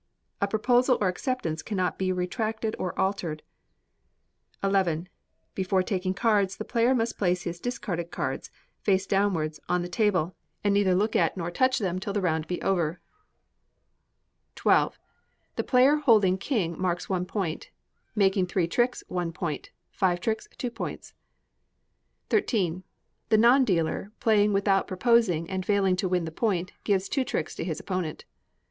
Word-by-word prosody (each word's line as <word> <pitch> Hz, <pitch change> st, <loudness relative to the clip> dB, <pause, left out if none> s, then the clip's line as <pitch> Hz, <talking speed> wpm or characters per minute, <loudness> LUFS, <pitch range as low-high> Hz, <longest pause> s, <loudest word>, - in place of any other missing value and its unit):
A 200 Hz, -, +3 dB
proposal 245 Hz, +4 st, +3 dB
or 205 Hz, -, +2 dB
acceptance 180 Hz, -, -2 dB
cannot 185 Hz, -3 st, -2 dB
be 190 Hz, -1 st, +1 dB
retracted 220 Hz, +4 st, -2 dB
or 180 Hz, -, -3 dB
altered. 180 Hz, -6 st, -1 dB, 1.2 s
xi. 185 Hz, -5 st, +1 dB, 0.5 s
Before 190 Hz, 0 st, +1 dB
taking 185 Hz, -1 st, -1 dB
cards, 200 Hz, -3 st, +2 dB
the 215 Hz, -, -5 dB
player 235 Hz, +3 st, +2 dB
must 230 Hz, -1 st, -1 dB
place 180 Hz, -2 st, +1 dB
his 170 Hz, 0 st, -5 dB
discarded 175 Hz, -7 st, -3 dB
cards, -, -, -3 dB, 0.3 s
face 195 Hz, -1 st, +1 dB
downwards, 180 Hz, -7 st, 0 dB
on 180 Hz, 0 st, +1 dB
the -, -, -4 dB
table, 180 Hz, -3 st, +1 dB, 0.3 s
and 205 Hz, -1 st, +3 dB
neither 200 Hz, -2 st, +3 dB
look 210 Hz, +4 st, +1 dB
at -, -, +2 dB
or 175 Hz, -1 st, -3 dB
touch 255 Hz, +7 st, +2 dB
them 185 Hz, -5 st, -1 dB
till 200 Hz, +1 st, -4 dB
the 205 Hz, -, +1 dB
round 160 Hz, -4 st, 0 dB
be 180 Hz, -, -3 dB
over. 175 Hz, -3 st, 0 dB, 1.6 s
xii. -, -, +4 dB, 0.8 s
The -, -, -1 dB
player 265 Hz, +3 st, +5 dB
holding 215 Hz, -10 st, +4 dB
king 185 Hz, -, -1 dB
marks 175 Hz, -1 st, -1 dB
one 180 Hz, -2 st, -1 dB
point; 180 Hz, -5 st, -3 dB, 0.5 s
making 195 Hz, -3 st, +3 dB
three 180 Hz, -1 st, 0 dB
tricks, 240 Hz, +8 st, 0 dB
one 175 Hz, -2 st, -2 dB
point; 165 Hz, -3 st, -4 dB, 0.2 s
five 180 Hz, -3 st, +1 dB
tricks, 220 Hz, +4 st, -2 dB
two 245 Hz, -, -3 dB
points. -, -, -6 dB, 1.2 s
xiii. 185 Hz, -, +1 dB, 0.5 s
The 220 Hz, -, +5 dB
non 240 Hz, +5 st, +6 dB
dealer 185 Hz, -1 st, 0 dB
playing 210 Hz, -2 st, +3 dB
without 195 Hz, -1 st, +2 dB
proposing 190 Hz, -4 st, +2 dB
and 190 Hz, +1 st, -3 dB
failing 195 Hz, -2 st, +2 dB
to 185 Hz, 0 st, -1 dB
win 180 Hz, -2 st, +1 dB
the 160 Hz, -, -5 dB
point, 185 Hz, -1 st, -1 dB
gives 195 Hz, -2 st, +1 dB
two 270 Hz, -, 0 dB
tricks 160 Hz, -10 st, -3 dB
to -, -, -4 dB
his 160 Hz, -2 st, -3 dB
opponent. 185 Hz, -5 st, -4 dB
190 Hz, 155 wpm, -27 LUFS, 175-215 Hz, 1.6 s, non